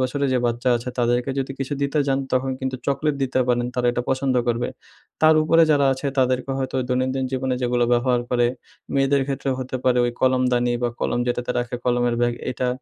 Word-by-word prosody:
বছরের 140 +2 0
যে - - +3
বাচ্চা 120 +2 -1
আছে, 120 +2 -6
তাদেরকে 120 +2 +1
যদি 135 0 -2
কিছু 135 +2 -3
দিতে 140 +2 0
যান, 135 0 +1
তখন 130 +1 +1
কিন্তু 130 0 -2
চকলেট 140 +2 0
দিতে 130 0 0
পারেন। 120 0 +1
তারা 125 -1 0
এটা 120 - -2
পছন্দ 130 0 0
করবে। 120 +1 0 0.5
তার 155 0 +7
উপরে 165 +1 +4
যারা 140 -2 +4
আছে, 135 +2 -4
তাদেরকে 130 +1 +1
হয়তো 130 0 -3
দৈনন্দিন 130 +1 0
জীবনে 130 0 -1
যেগুলো 120 0 +1
ব্যবহার 120 0 +2
করে, 120 -1 +3 0.5
মেয়েদের 135 0 +2
ক্ষেত্রে 135 0 -2
হতে 130 0 -4
পারে 125 -1 +3
ওই 120 - 0
কলমদানি 125 -2 +2
বা, 120 - +2
কলম - - 0
যেটাতে 125 0 -2
রাখে 120 0 -3
কলমের 120 -1 +1
ব্যাগ 120 0 +2 0.2
এটা, 125 0 -2
130 Hz, 195 wpm, -22 LUFS, 120-135 Hz, 0.5 s, তার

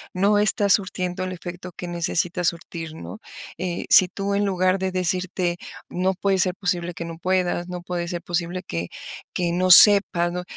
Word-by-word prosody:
no 200 +3 +2
está 210 -1 +5
surtiendo 185 -2 0
el 185 - -5
efecto 180 +1 -8
que 180 - -6
necesita 175 +1 -2
surtir, 165 -1 -4
¿no? 215 - -9 0.4
Eh, 180 -2 -3
si 185 - +7
tú 195 +2 -4
en 205 +1 +1
lugar 185 0 +1
de 190 0 -2
decirte: 180 -1 -1 0.3
"No 185 +2 -1
puede 195 0 0
ser 185 -1 +1
posible 180 -2 -2
que 170 - -6
no 165 -1 -8
puedas, 180 -1 -1
no 180 -1 -6
puede 175 -1 -4
ser 175 0 -4
posible 175 +1 -3
que 85 - -5 0.5
que 175 -1 -1
no 180 +2 0
sepas, 180 -3 +6
¿no?". 180 +1 -4
180 Hz, 180 wpm, -23 LUFS, 175-185 Hz, 0.5 s, si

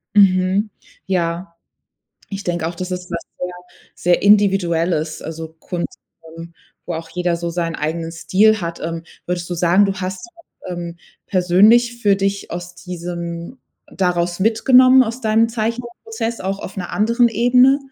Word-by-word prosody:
Mhm, 195 +1 +4 0.4
ja. 170 -1 -2 0.8
Ich 200 0 -5
denke 175 -2 -1
auch, 170 - -4
dass 185 +2 -5
ist 180 0 -5
was 170 - -3 0.2
sehr 180 0 -4 0.4
sehr 175 0 +1
Individuelles, 175 -6 +2
also 160 0 -6
Kunst, 175 +1 -5 0.4
ähm, 165 0 -10 0.3
wo 175 - -3
auch 165 0 -6
jeder 175 0 -1
so 170 0 -4
seinen 170 -1 -2
eigenen 165 +2 -3
Stil 190 +6 +3
hat. 170 0 -5
Ähm, 165 0 -4 0.2
würdest 175 -1 -3
du 175 - -1
sagen, 175 +4 +4
du 195 -1 0
hast, 190 - -5 0.4
ähm, 175 -1 -5 0.3
persönlich 210 +7 +4
für 205 -3 +3
dich 195 0 -2
aus 175 0 -6
diesem 170 +4 -6 0.3
daraus 175 -1 -1
mitgenommen 255 +5 +6
aus 235 +1 -4
deinem 225 0 +3
Zeichenprozess, 235 - -4
auch 195 +1 -2
auf 185 - -8
'ner 180 -2 -5
anderen 235 +3 +3
Ebene? 250 +4 +4
180 Hz, 145 wpm, -19 LUFS, 170-215 Hz, 0.8 s, mitgenommen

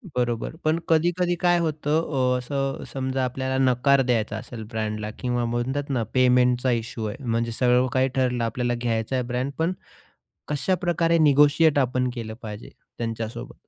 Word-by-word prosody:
बरोबर 120 +2 -1
पण 155 +2 +2
कधी-कधी 175 +2 +2
काय 175 -1 +3
होतं 150 -4 0
अ, - - +1
असं 135 +2 -3
समजा 130 0 -1
आपल्याला 130 +1 -2
नकार 135 +2 +4
द्यायचा 115 -3 0
असेल 110 0 -8
ब्रँडला 110 -1 -3
किंवा 120 -1 -1
म्हणतात 130 +5 -2
ना, 125 -4 0
पेमेंटचा 125 0 +3
इश्यू 115 -1 -3
आहे. 105 +5 -6
म्हणजे 115 0 0
सगळं 125 +2 +3
काही 130 0 +3
ठरलं. 125 -2 +1
आपल्याला 120 +1 -1
घ्यायचा 120 +1 -1
आहे 125 - 0
ब्रँड. 130 +3 -1
पण 165 +3 +1 0.7
कशाप्रकारे 170 +2 +1
निगोशिएट 150 +1 +5
आपण 125 -1 +1
केलं 115 -3 -6
पाहिजे 105 -1 -8 0.3
त्यांच्यासोबत? 115 +3 -5
125 Hz, 150 wpm, -24 LUFS, 120-145 Hz, 0.7 s, निगोशिएट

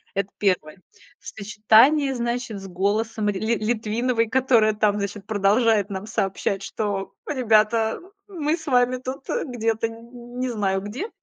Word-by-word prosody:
Это 195 0 -1
1. 185 -4 0 0.4
В - - -15
сочетании, 225 +8 +3
значит, 235 -3 -3
с 195 - -9
голосом 210 +3 -1
рь - - 0
Ли 225 +3 0
Литвиновой, 230 +1 0
которая 235 -3 +3
там, 210 -1 +1
значит, 200 0 -4
продолжает 210 0 +2
нам 195 +2 -5
сообщать, 195 -1 -2
что, 200 -2 -3
ребята, 225 -4 +2 0.3
мы 325 -4 -1
с 320 - -12
вами 250 -2 +2
тут, 260 +3 -7
э, 480 - -1
где-то, 230 -3 -1
нь 240 +2 -12
не 255 0 -1
знаю, 195 -4 -1
где. 245 - -5
220 Hz, 150 wpm, -23 LUFS, 205-245 Hz, 0.4 s, сочетании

